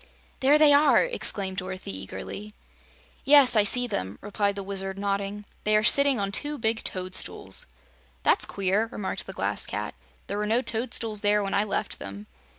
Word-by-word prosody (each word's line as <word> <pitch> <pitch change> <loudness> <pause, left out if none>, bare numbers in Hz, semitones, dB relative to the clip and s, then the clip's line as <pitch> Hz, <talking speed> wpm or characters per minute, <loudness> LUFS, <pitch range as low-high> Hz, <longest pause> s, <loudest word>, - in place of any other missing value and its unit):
"There 280 +3 +4
they 300 -1 +6
are!" 285 0 +5
exclaimed 200 - 0
Dorothy 185 - -5
eagerly. 95 - -8 0.7
"Yes, 280 -3 +6
I 215 - +6
see 245 +4 +2
them," 100 - -4
replied 205 0 -2
the 200 - -5
Wizard, 195 0 -4
nodding. 200 +1 -3 0.2
"They 215 0 +2
are 215 - +1
sitting 280 +1 +4
on 200 -1 -2
two 295 +8 -2
big 225 -1 -1
toadstools." 185 0 -1 0.6
"That's - - +3
queer," 200 +3 0
remarked 195 - -4
the - - -7
Glass - - -1
Cat. - - -5 0.3
"There 205 - -4
were 210 - -2
no 235 +4 +1
toadstools 225 -3 0
there 210 0 +2
when 195 - -3
I 200 - +2
left 215 - -4
them." 100 +1 -8
205 Hz, 170 wpm, -26 LUFS, 195-235 Hz, 0.7 s, they